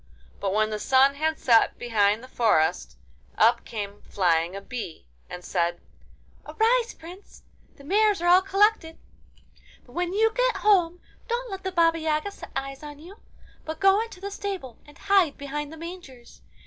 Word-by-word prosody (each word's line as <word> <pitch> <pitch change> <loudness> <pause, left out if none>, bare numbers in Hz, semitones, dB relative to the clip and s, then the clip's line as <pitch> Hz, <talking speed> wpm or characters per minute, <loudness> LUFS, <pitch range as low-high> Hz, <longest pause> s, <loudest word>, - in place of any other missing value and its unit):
But 195 - -2
when 215 +2 +1
the 215 - -3
sun 270 +4 +4
had 315 +2 -1
set 230 -3 +3
behind 215 -2 +1
the - - -10
forest, 160 - +1 0.4
up 230 +3 +4
came 205 -2 -7
flying 175 -1 0
a - - -4
bee, 220 - -7 0.2
and 180 0 -9
said: 170 0 -1 0.6
'Arise, 470 +2 +1
Prince! 355 +5 -14 0.3
The 280 - -16
mares 415 +5 +2
are 345 - -3
all 360 +2 +7
collected. 390 -3 +1 0.9
But - - -19
when 355 0 -2
you 445 +3 +2
get - - +1
home, 360 -4 +2 0.3
don't 480 0 -3
let 385 0 -6
the 380 - -3
Baba 330 -2 +2
Yaga 315 +4 -1
set - - -11
eyes 270 0 -5
on 295 -1 -9
you, 355 +8 -14 0.4
but 315 0 -6
go 390 +2 +4
into 455 -5 -7
the 400 +1 -6
stable 380 - -6
and 295 - -16
hide 390 -7 +2
behind 290 +1 -5
the 320 - -10
mangers. 325 -8 -11
315 Hz, 170 wpm, -25 LUFS, 235-390 Hz, 0.9 s, all